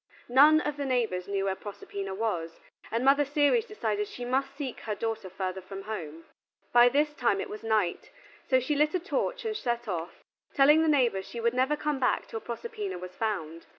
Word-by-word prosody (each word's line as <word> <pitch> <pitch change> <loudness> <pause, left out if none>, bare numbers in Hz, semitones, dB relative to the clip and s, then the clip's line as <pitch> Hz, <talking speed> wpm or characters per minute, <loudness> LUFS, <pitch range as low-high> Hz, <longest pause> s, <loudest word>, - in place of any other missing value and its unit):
None 295 +5 +7
of 295 -1 -3
the 285 - -2
neighbors 230 -9 0
knew 195 -1 -1
where 195 - +1
Proserpina 195 -1 -6
was, 175 -7 -2 0.3
and 235 +3 -1
Mother 280 +2 +5
Ceres 290 - +2
decided 215 - -2
she 245 - -7
must 270 +2 -1
seek 275 -4 -5
her 215 -2 -4
daughter 225 -3 -3
further 185 0 -4
from 195 +1 -8
home. 165 -7 -6 0.5
By 240 0 +8
this 295 +3 +1
time 235 -8 +1
it - - -4
was 210 - -7
night, 215 -6 0 0.4
so 260 - +5
she 260 +4 -1
lit 300 +3 +2
a - - +2
torch 430 +7 -2
and 435 -1 -1
set 240 - -2
off, 175 -3 -5 0.3
telling 295 +3 +6
the 320 - +2
neighbors 245 -10 +2
she 235 - -6
would 235 0 +1
never 260 +4 +2
come 300 -2 -2
back 255 - +1
till 225 - -6
Proserpina 415 - -5
was 180 0 -8
found. 170 -7 -3
240 Hz, 200 wpm, -28 LUFS, 195-290 Hz, 0.5 s, By